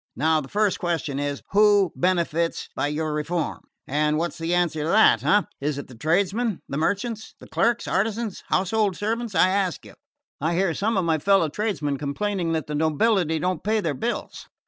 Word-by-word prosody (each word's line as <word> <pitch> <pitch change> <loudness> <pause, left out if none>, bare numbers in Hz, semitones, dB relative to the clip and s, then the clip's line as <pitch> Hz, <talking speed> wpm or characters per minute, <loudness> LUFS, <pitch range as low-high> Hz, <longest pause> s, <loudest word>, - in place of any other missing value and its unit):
Now 155 +3 +2
the 135 - -9
first 210 -1 +1
question 160 -5 -2
is: 145 -1 -3
who 205 -3 +4
benefits 170 -2 0
by - - 0
your 155 +1 -2
reform? 160 +3 -2 0.3
And 150 +2 +1
what's 170 +1 -3
the 165 +1 -2
answer 170 -3 0
to 150 - -2
that, 220 +5 +5
eh? 205 0 +4 0.2
Is 145 0 -2
it 140 - -6
the - - -11
tradesmen? 195 - 0
The 140 - -4
merchants? 205 +6 -2
The - - -13
clerks, 235 0 0
artisans, 215 +1 -1
household 195 +1 +1
servants, 225 0 -2
I 185 +2 +5
ask 190 -2 -1
you? - - -13 0.5
I 160 +3 0
hear 185 -1 +1
some 215 +4 0
of 185 - +1
my 160 -2 +1
fellow 195 -1 +3
tradesmen 150 -6 -2
complaining 170 +5 -2
that 160 -3 -1
the 150 - -6
nobility 160 +3 +2
don't 180 0 -2
pay 215 +1 +1
their 165 -7 -1
bills. 235 - -4
175 Hz, 190 wpm, -24 LUFS, 155-205 Hz, 0.5 s, that